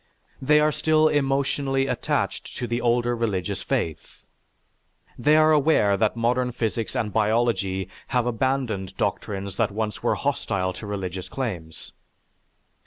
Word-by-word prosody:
They 150 +3 +4
are 150 0 +3
still 155 +1 +3
emotionally 135 -1 +1
attached - - -2
to 125 - -2
the 120 +1 -2
older 120 0 +2
religious 100 -4 -2
faith. 80 -2 -3 0.9
They 150 +6 +3
are 155 0 +5
aware 145 -9 +4
that 110 +2 +1
modern 125 +1 0
physics 115 +1 -2
and 110 -5 -1
biology 105 -4 +1 0.2
have 125 -2 +1
abandoned 120 -5 -1
doctrines 100 -2 -3
that 115 -2 +2
once 105 0 -3
were - - +1
hostile 95 -1 -1
to 95 +3 -8
religious 95 -2 -4
claims. 90 -12 -5
115 Hz, 130 wpm, -24 LUFS, 100-135 Hz, 0.9 s, are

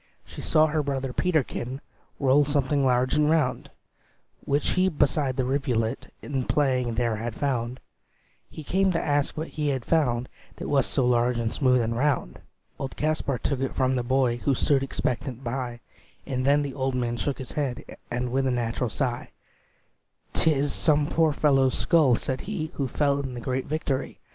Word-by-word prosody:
She - - -9
saw 155 0 +4
her 155 0 0
brother 135 -2 -3
Peterkin 135 -7 -1 0.4
Roll 140 +1 +4
something 145 -1 +1
large 125 0 +2
and 150 0 +3
round, 140 -3 +1 0.7
Which 145 +1 +1
he 185 +1 +3
beside 145 -4 +1
the 130 - +1
rivulet 125 -3 -1
In 135 -3 -2
playing 130 -5 +1
there 115 -2 0
had 115 +1 -4
found; 125 -3 -2 0.7
He 155 - -9
came 190 +5 +2
to 165 - +1
ask 145 0 0
what 160 +2 -3
he 150 -1 -2
had 135 -4 -1
found, 125 -7 +1 0.3
That - - -6
was 140 -3 +2
so 130 - +1
large 120 0 +2
and 115 -1 -1
smooth 125 -3 +3
and 115 0 -1
round. 135 - 0 0.4
Old 135 -1 -5
Kaspar 150 -3 0
took 135 +3 -2
it 135 0 -2
from 130 0 +2
the 125 - +1
boy, 125 -1 +1
Who 135 +2 +1
stood 140 +2 +2
expectant 130 -1 -3
by; 120 -1 -4 0.4
And 130 -1 -2
then 145 +1 +4
the 140 -2 -4
old 130 -1 -1
man 120 -1 -1
shook 140 +3 -2
his 130 - -7
head, 140 -5 -3 0.2
And 125 +1 -2
with 135 +1 +1
a - - +1
natural 120 0 -1
sigh, 120 +2 -2 1.0
"'T 160 - +3
is 145 -1 0
some 150 -2 +2
poor 160 -1 +3
fellow's 135 -3 +2
skull," 155 -8 +4
said 130 +1 -3
he, 175 -6 -4
"Who 140 - -2
fell 140 +2 +1
in 130 -3 -4
the - - -5
great 130 +2 -2
victory. 145 -3 -2
135 Hz, 180 wpm, -26 LUFS, 125-145 Hz, 1.0 s, saw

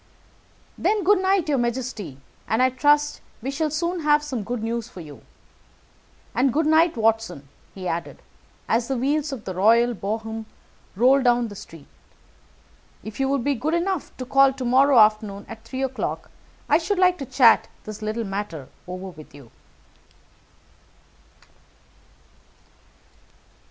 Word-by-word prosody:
"Then, 425 -2 +1
good 405 +1 +4
night, 380 -3 +2
your 285 -3 +1
majesty, 235 - -3 0.3
and 225 +3 +2
I 260 - +3
trust 295 +3 +2
that - - -26 0.2
we 270 - -2
shall 305 +2 -1
soon 340 +4 -2
have 295 -1 +3
some 260 -7 -4
good 230 +1 -4
news 230 0 -3
for - - -12
you. 150 -4 -11 1.1
And 260 +1 +2
good 310 +5 +1
night, 315 -1 +3
Watson," 225 -10 0 0.3
he 185 -2 -6
added, 170 0 -4 0.4
as 230 +1 +1
the 270 - -1
wheels 290 +4 0
of 255 -5 -7
the 185 - -4
royal 230 +6 +4
brougham 220 +1 -4 0.5
rolled 260 +5 +4
down 240 -1 +3
the 205 - -10
street. 165 -6 -12 1.2
"If 215 +3 -9
you 270 0 +1
will 280 - +2
be 280 +3 0
good 295 +6 -1
enough 355 -1 -2
to 255 - -5
call 275 +1 +5
to 260 -1 -5
morrow 265 +2 +4
afternoon, 215 -2 +3
at 225 0 -10
three 265 0 -4
o'clock, 265 -1 -4 0.4
I 300 - +4
should 395 +4 -2
like 365 -1 +3
to 275 - -4
chat 235 -3 +5 0.2
this 215 0 -8
little 215 +2 -2
matter 195 -8 -5 0.2
over 185 +1 -6
with 155 -5 -14
you." 135 -5 -15
245 Hz, 150 wpm, -23 LUFS, 215-290 Hz, 1.2 s, call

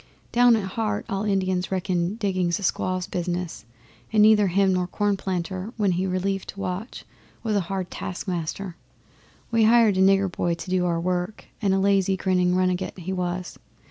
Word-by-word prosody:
Down 245 -1 +6
at 215 - -1
heart 210 0 -2
all 195 +1 -2
Indians 190 -2 0
reckon 185 0 0
digging 190 -5 0
a 170 +4 -1
squaw's 185 -1 0
business, 175 -5 -4 0.5
and 215 -1 +5
neither 210 -1 +6
him 190 +1 +3
nor 180 -1 0
Cornplanter, 190 0 -2
when 205 -3 +2
he 180 +2 0
relieved 190 +1 -2
watch, 195 +4 -5 0.4
was 220 -2 0
a - - +3
hard 190 -2 -3
task 185 +3 -5
Master. 175 +1 -3 0.8
We 225 -1 +4
hired 225 -3 +5
a - - +3
nigger 195 0 +4
boy 175 -1 -1
to 175 - -8
do 180 -1 +2
our 170 -1 0
work, 180 +3 -2 0.2
and 200 -3 +2
a 190 - +3
lazy 195 -1 +2
grinning 180 -1 +2
runagate 185 0 0
he 185 +1 -4
was. 180 0 -3
190 Hz, 175 wpm, -24 LUFS, 180-200 Hz, 0.8 s, Down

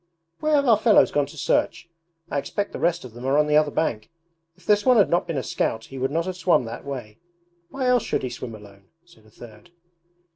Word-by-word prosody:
'Where 310 0 +1
have 280 -1 +2
our 225 -4 +4
fellows 220 -1 +4
gone 145 -1 +1
to 155 - -13
search? 170 - 0 0.4
I 140 - 0
expect 200 +8 -4
the - - -7
rest 170 -4 0
of 120 - -11
them 120 +1 -10
are 135 +2 +1
on 150 - +4
the 150 0 +1
other 150 -1 +4
bank. 115 -8 -2 0.5
If 185 - -24
this 210 -1 +3
one 255 -2 +4
had 205 - +4
not 175 0 +1
been 165 -4 -3
a 130 - -2
scout 110 0 -2
he 135 - -9
would 130 +1 0
not 165 +4 -1
have 185 -1 -4
swum 175 -9 +2
that 115 +1 -7
way. 125 -7 -7 0.5
Why 270 -1 -4
else 250 -1 +3
should - - -2
he 130 - -2
swim 120 -1 -7
alone?' 100 -2 -16 0.2
said 110 -11 -22
a - - -19
third. 110 +6 -15
145 Hz, 245 wpm, -23 LUFS, 120-185 Hz, 0.5 s, our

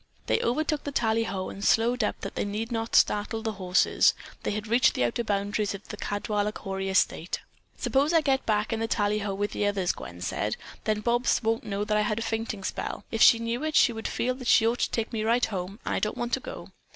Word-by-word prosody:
They - - +2
overtook 300 +4 0
the 285 - -4
tallyho 220 -6 0
and 200 - -8
slowed 235 +3 +3
up - - -2
that - - -5
they - - -1
need 215 +3 -3
not 225 -1 -2
startle 220 +2 +2
the 220 - -1
horses. 180 0 +3 0.3
They - - -2
had 210 0 -3
reached 235 +3 +3
the - - +1
outer 120 - 0
boundaries 205 0 -1
of 200 - -11
the - - -5
Caldwaller 210 0 -2
Cory 195 0 -4
estate. 185 -2 +1 0.4
"Suppose 280 +3 +1
I 330 -1 +5
get 270 -2 +1
back 215 +1 +1
in 225 - -1
the 225 - -1
tallyho 205 -2 0
with 205 +1 -2
the 205 - 0
others," 195 -3 +1
Gwen 85 0 -9
said, 105 +3 -2 0.3
"then 215 -1 0
Bobs 240 +2 +1
won't 225 +1 0
know 205 -1 -2
that 210 0 +1
I - - +3
had 210 0 0
a 230 - -2
fainting 225 -3 -3
spell. - - -4
If 225 - -2
she 230 - +8
knew 230 +4 -3
it, 310 -1 -2
she 240 - +5
would 225 0 -4
feel 255 +1 -1
that 255 -1 -8
she 225 - +5
ought 235 +2 +1
to - - +1
take 230 +1 -2
me 215 -1 -1
right 235 +3 +3
home, 195 0 -5
and - - -1
I - - +1
don't 215 - -2
want 240 0 -3
to 265 - +2
go." - - -9
220 Hz, 240 wpm, -27 LUFS, 205-235 Hz, 0.4 s, she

